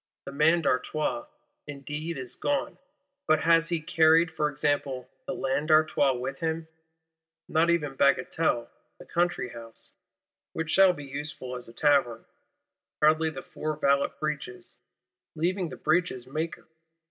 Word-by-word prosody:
The - - -6
Man 160 +4 +3
d'Artois 155 - -1 0.4
indeed 150 +3 -5
is 130 -2 -4
gone; 285 -1 -2 0.5
but 155 -1 +3
has 165 0 +4
he 170 -2 0
carried, 160 +2 +4
for 150 -1 0
example, 145 -2 -1 0.2
the 180 - -3
Land 135 0 -1
D'Artois 155 -3 +4
with 130 +2 -5
him? 160 0 -2 0.8
Not 165 +2 +2
even 155 -5 +1
Bagatelle 140 -1 +1 0.3
the - - -13
Country 175 -7 0
house 115 -1 -11 0.6
(which 160 -1 -3
shall 190 -1 +6
be 145 -4 -9
useful 140 -2 -6
as 125 - -9
a - - -11
Tavern); 135 -5 +2 0.7
hardly 155 +1 +4
the 175 +3 -8
four 155 -3 -4
valet 140 -1 +2
Breeches, 150 -5 -5 0.6
leaving 175 +2 -1
the - - -9
Breeches 155 -6 0
maker! 155 +5 -4
155 Hz, 135 wpm, -27 LUFS, 140-165 Hz, 0.8 s, shall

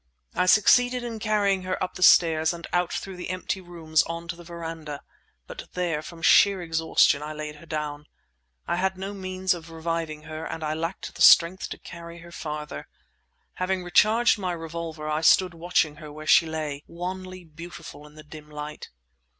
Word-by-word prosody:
I 180 - +1
succeeded 245 +5 +5
in 230 -2 -5
carrying 205 -3 +1
her 185 0 -2
up 185 - -4
the - - -9
stairs 160 -2 +5
and 170 0 -8
out 175 -1 +1
through 190 -2 -5
the 180 - -6
empty 185 +1 -3
rooms 165 -3 0
on 170 0 -5
to 170 - -3
the 175 - -12
verandah; 165 -3 -7 0.4
but - - -9
there, 170 -4 -1
from 165 +1 -11
sheer 200 -1 +6
exhaustion, 160 -3 +2
I 150 +1 -5
laid 150 0 -6
her 170 - -15
down. 150 -1 -4 0.6
I 175 - 0
had 190 +1 0
no 195 +2 -5
means 185 -1 -1
of 170 -1 -9
reviving 165 -1 -4
her 155 0 -7
and 165 - -5
I 155 0 -1
lacked 165 +4 -4
the - - -9
strength 175 +2 +6
to - - -6
carry 170 0 -10
her 170 0 -13
farther. 150 - -6 0.7
Having 185 0 0
recharged 215 +6 +4
my 185 -2 -2
revolver, 165 -1 -6
I 155 +1 0
stood 180 +2 +5
watching 165 -3 0
her 150 -2 -10
where 155 +1 -9
she 165 +1 +5
lay, 155 -3 -4
wanly 185 +1 -6
beautiful 160 -2 -11
in 150 - -18
the 155 - -12
dim 150 0 -12
light. 150 0 -7
170 Hz, 185 wpm, -26 LUFS, 155-185 Hz, 0.7 s, sheer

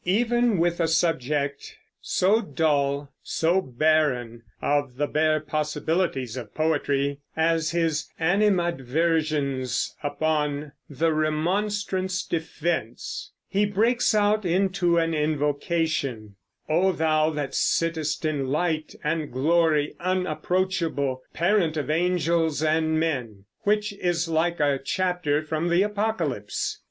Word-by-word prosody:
Even 235 +3 +2
with 170 +1 +1
a 165 - +2
subject 145 -4 -1 0.2
so 205 +5 +2
dull, 145 -5 0
so 170 +4 +1
barren 130 -5 +1 0.2
of 145 -3 0
the 145 - +1
bare 155 +1 +2
possibilities 150 -3 -1
of 125 - -8
poetry, 145 -3 0 0.2
as 160 0 +2
his 165 -3 0
"Animadversions 160 -6 +1
upon 150 -1 -1 0.2
the 155 +3 +1
Remonstrants' 185 +4 -1
Defense," 160 -6 -3 0.2
he 205 +1 +1
breaks 225 +4 +2
out 210 0 +3
into 185 -1 +1
an 165 0 +1
invocation, 150 - -1 0.3
"Oh, 180 +5 +3
Thou 155 -1 +2
that 145 -3 -3
sittest 160 -2 0
in 145 -4 -1
light 155 +2 -1
and 155 0 -1
glory 150 +2 +2
unapproachable, 175 -5 -1
parent 170 -3 +2
of 150 0 -1
angels 165 -2 +1
and 160 0 +2
men," 125 -11 -2 0.2
which 210 0 +1
is 175 -4 -1
like 165 +1 0
a 145 -2 +2
chapter 180 -4 0
from 155 +2 -2
the 175 +3 +4
Apocalypse. 205 - -2
160 Hz, 110 wpm, -25 LUFS, 145-175 Hz, 0.3 s, the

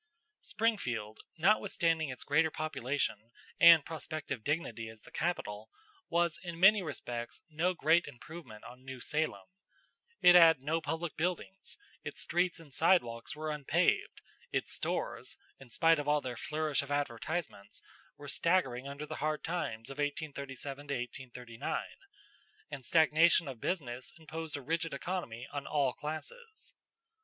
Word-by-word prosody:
Springfield, 120 - -1 0.2
notwithstanding 165 -4 +2
its 130 - -6
greater 160 +3 +3
population 135 -7 -2 0.3
and 165 -3 +9
prospective 155 -6 -5
dignity 120 -7 -2
as 110 -1 -12
the - - -15
capital, 110 -11 -2 0.4
was 170 -1 +1
in 175 -2 -6
many 200 +3 +7
respects 120 -7 -5
no 175 +4 +1
great 165 +2 +3
improvement 125 -5 -10
on 125 +1 -12
New 130 -1 -7
Salem. 155 +5 -1 0.7
It 180 - +8
had 165 -4 +8
no 155 +5 -1
public 160 +2 -3
buildings, 180 +3 -3 0.3
its - - -5
streets 175 0 0
and 150 -5 -14
sidewalks 120 -10 +2
were 155 0 -3
unpaved, 150 -3 +1 0.3
its - - 0
stores, - - -3 0.2
in 135 -2 -13
spite 165 +6 +4
of 145 - -4
all 150 0 +4
their 125 -3 -5
flourish 155 +2 0
of 140 - -9
advertisements, 145 -4 -3 0.3
were 145 - -10
staggering 140 -6 +1
under 140 +2 -6
the - - -6
hard 155 +1 -1
times 140 -10 -3
of 135 - -9
1837 145 -1 -4 0.4
39, 120 -2 -4 0.9
and 140 -3 -6
stagnation 160 +3 +5
of 130 -4 -7
business 130 -6 -3
imposed 160 -1 -5
a 140 - -8
rigid 165 +1 -1
economy 135 -7 -4
on 145 -1 -4
all 140 -4 +1
classes. 430 - -7
150 Hz, 135 wpm, -33 LUFS, 130-165 Hz, 0.9 s, and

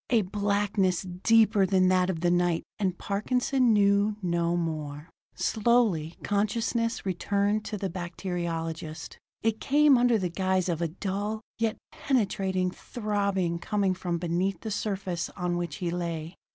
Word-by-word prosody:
A 230 -4 +4
blackness 200 -1 0
deeper 205 +3 +3
than 185 -1 +3
that 185 0 +3
of 165 -4 -2
the 175 0 +2
night 175 -1 +2 0.2
and 185 -3 0
Parkinson 250 +4 +1
knew 205 0 +3
no 170 -1 +1
more.... 155 -2 -4 0.2
Slowly 215 -8 +1
consciousness 230 +3 0
returned 200 +3 0
to 210 - -4
the 195 - -2
bacteriologist. 170 -3 -4 0.2
It 220 -1 +1
came 290 -2 +5
under 240 -2 +4
the 185 -4 -1
guise 185 +1 0
of 170 -1 -1
a 170 - +1
dull, 200 +5 -3 0.2
yet 225 -1 0
penetrating 190 -7 0
throbbing 200 -6 -1
coming 200 -1 0
from 175 -2 -2
beneath 175 +2 -1
the 220 - -5
surface 195 -4 -2
on 180 -2 -1
which 175 -3 -3
he 175 -2 -3
lay. 170 -2 -3
190 Hz, 140 wpm, -28 LUFS, 175-210 Hz, 0.2 s, came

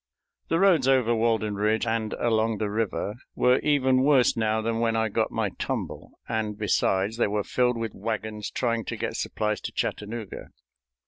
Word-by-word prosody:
The 165 - +1
roads 180 -9 +4
over 130 -3 +3
Walden 110 -2 +1
Ridge 105 +2 +1
and 110 -1 -1
along 110 -1 +1
the 105 -1 -2
river 110 0 -2 0.2
were 125 +1 +4
even 130 -3 +2
worse 135 -3 +4
now 110 -1 +1
than 115 +1 -1
when 115 -1 +1
I 110 0 +1
got - - 0
my - - -1
tumble, - - -4
and, 110 -2 -2
besides, 105 0 +1
they 120 - +2
were 105 0 -1
filled 125 +1 +1
with 115 -1 -3
wagons 105 0 -4
trying 115 -2 -1
to - - -4
get - - -3
supplies 105 -1 -2
to - - -5
Chattanooga. 110 0 -4
115 Hz, 175 wpm, -26 LUFS, 105-120 Hz, 0.2 s, roads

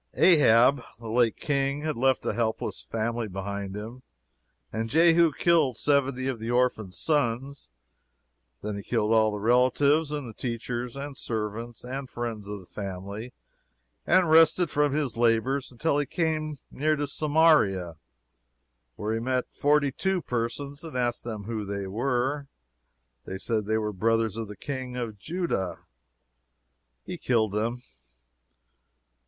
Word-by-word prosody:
Ahab, 135 -5 +6 0.2
the 115 -2 -7
late 120 -1 +2
King, 140 0 0
had 155 -1 -1
left 130 +2 +1
a - - 0
helpless 110 - -2
family 115 - -2
behind 100 0 -5
him, 115 +5 -8 0.7
and 115 +1 -2
Jehu 165 +3 +5
killed 150 -5 +2
seventy 135 -2 +1
of 130 -4 -2
the 115 +1 -5
orphan 120 -5 +1
sons. 135 - -1 0.9
Then 105 0 -3
he - - -5
killed 105 +2 0
all 110 -1 +4
the 105 - -3
relatives, 130 +7 +3
and 135 -7 -5
teachers, 120 0 -4
and 140 0 -6
servants 115 0 -4
and 130 +1 -5
friends 115 -4 -5
of 105 0 -5
the - - -16
family, 100 +5 -6 0.8
and 185 -2 +5
rested 160 +1 +5
from 145 -1 +2
his 140 -6 -1
labors, 120 +4 +1
until 145 +4 0
he 145 - -1
was - - -19
come 155 -3 0
near 155 +2 +1
to 145 0 -1
Samaria, 145 - +3 1.0
where 105 +1 -2
he 115 - -1
met 125 +1 -2
forty 145 -1 +2
two 190 +4 -1
persons 130 +5 -3
and 160 -6 -6
asked 120 -1 0
them 110 -3 -5
who 110 0 -4
they 100 0 -4
were; 130 +7 -1 0.8
they 95 - -5
said 110 +1 -1
they 110 0 +2
were 105 -1 -2
brothers 115 +2 +1
of 115 -1 -4
the 105 -1 -9
King 130 -1 -5
of 115 -4 -4
Judah. 155 - -2 1.3
He 180 - -6
killed 110 -4 +1
them. 115 +4 -2
120 Hz, 145 wpm, -27 LUFS, 110-145 Hz, 1.3 s, Ahab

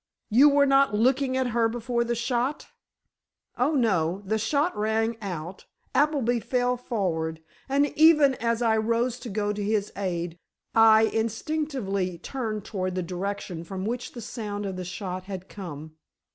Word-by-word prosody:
"You 270 +7 +7
were 285 0 +4
not 275 -4 +4
looking 260 +4 +2
at 260 -1 +1
her 230 -1 +2
before 235 +1 -1
the 235 0 -1
shot?" 245 +4 -1 0.9
"Oh, 280 +6 +1
no; 190 - +1
the 220 +3 0
shot 285 +10 +1
rang 220 +2 0
out, 180 -2 -6 0.3
Appleby 275 -5 +2
fell 250 +2 0
forward, 175 -10 -2 0.3
and 280 +2 +3
even 305 -3 +6
as 230 0 0
I 220 -1 +3
rose 230 +3 0
to 240 - -7
go 205 0 -1
to 210 - -4
his 210 0 -1
aid, 175 -3 -3 0.3
I 220 -1 +7
instinctively 225 - -1
turned 215 +1 -4
toward 185 -4 -3
the 185 - -1
direction 180 -1 -4
from 190 +2 -5
which 240 +2 -4
the 240 - -7
sound 210 -3 -5
of 190 -1 -4
the 185 0 -5
shot 185 0 -5
had 190 -1 -7
come. 155 -6 -8
220 Hz, 160 wpm, -26 LUFS, 190-250 Hz, 0.9 s, You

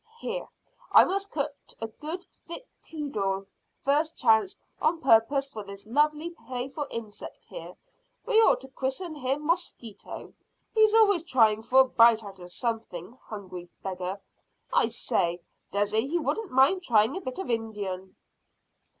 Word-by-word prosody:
"Here, - - -4 0.4
I - - +9
must 395 +2 -1
cut 290 -1 -2 0.3
a 225 - -3
good 315 - -7 0.2
thick 355 +9 -5 0.2
cudgel 200 -11 -2 0.4
first 305 +4 +1
chance 220 -4 +3 0.2
on 320 +2 +2
purpose 270 +2 +4
for 220 -6 -7
this 200 0 -9
lovely 300 +7 +1
playful 270 -1 -5
insect 220 -3 -7
here. - - -9 0.5
We 450 - +5
ought - - +4
to 265 - -7
christen 270 +6 -3
him 280 +1 -2
Mosquito. 330 - -3 0.4
He's 435 -1 +5
always 405 -6 +5
trying 220 -9 +4
for 260 +4 +5
a - - +5
bite 230 -2 +5
out 195 -2 -10
of 175 0 -10
something 225 -3 -4
hungry 185 -4 -8
beggar. 185 0 -4 0.5
I - - +4
say, 170 0 0 0.3
dessay 205 +4 +1
he 335 +5 0
wouldn't 405 +5 -1
mind 270 +9 +4
trying 225 -4 +3
a 380 - -4
bit 255 -6 -5
of 380 -9 -3
Indian." 205 -5 -3
255 Hz, 145 wpm, -28 LUFS, 215-320 Hz, 0.5 s, I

